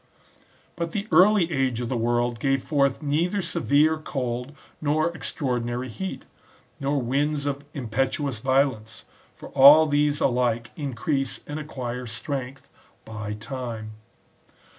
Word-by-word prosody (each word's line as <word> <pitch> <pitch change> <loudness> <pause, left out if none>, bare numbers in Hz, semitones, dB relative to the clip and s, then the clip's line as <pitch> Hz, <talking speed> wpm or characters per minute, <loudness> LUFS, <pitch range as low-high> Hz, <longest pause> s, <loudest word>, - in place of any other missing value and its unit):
But 170 -1 -4
the 205 0 -3
early 185 -2 +5
age 130 -5 0
of 120 - -3
the 130 - -2
world 120 0 0
gave 135 +1 +1
forth 140 -1 +1
neither 165 +7 0
severe 160 -3 +2
cold 125 -2 -4 0.3
nor 155 +3 +1
extraordinary 125 -4 -2
heat, 190 +11 -6 0.5
nor 140 +1 0
winds 140 +4 0
of 140 0 -2
impetuous 135 +1 -1
violence. 130 -3 0 0.3
For - - -11
all 145 +4 +8
these 145 -1 +1
alike 120 -2 +1
increase 135 -1 -2
and 145 +1 -5
acquire 125 -5 -5
strength 130 +3 -5 0.4
by 105 -1 -5
time. 115 -1 -6
135 Hz, 120 wpm, -25 LUFS, 120-150 Hz, 0.5 s, all